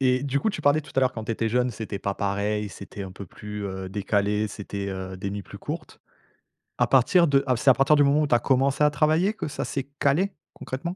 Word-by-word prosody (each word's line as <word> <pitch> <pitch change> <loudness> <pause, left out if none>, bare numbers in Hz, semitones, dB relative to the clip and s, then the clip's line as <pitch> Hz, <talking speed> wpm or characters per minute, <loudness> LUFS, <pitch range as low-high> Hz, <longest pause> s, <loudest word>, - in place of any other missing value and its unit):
Et 130 -1 +2
du 140 0 0
coup - - +1
tu 215 - -6
parlais 145 +2 +4
tout 150 - -14
à 135 - +3
l'heure 130 -1 +2
quand 110 - -6
tu 115 - -2
étais 115 0 -1
jeune, 125 +2 +1
c'était 110 -4 -5
pas 100 0 -2
pareil, 100 +1 -1
c'était 100 0 -9
un 95 -1 -7
peu 100 +1 -9
plus, 105 +3 -7
heu, 95 -1 -5
décalé, 105 +1 0
c'était, 100 -1 -5
heu, 95 -1 -5
des 100 +1 -4
nuits 100 0 -5
plus - - -11
courtes. - - -7 0.8
À - - +3
partir 170 +7 +5
de 140 -1 +3
à 130 -3 +1
c'est 135 - +3
à - - +9
partir 135 +4 +4
du 145 - +6
moment 140 +2 +3
où 150 - +1
tu 125 - +3
as - - +4
commencé 135 +3 +2
à 150 - +6
travailler 155 +7 +2
que - - -5
ça - - -4
c'est 135 - -3 0.2
calé, 165 +8 +2 0.2
concrètement? 170 +7 -5
125 Hz, 260 wpm, -25 LUFS, 100-140 Hz, 0.8 s, à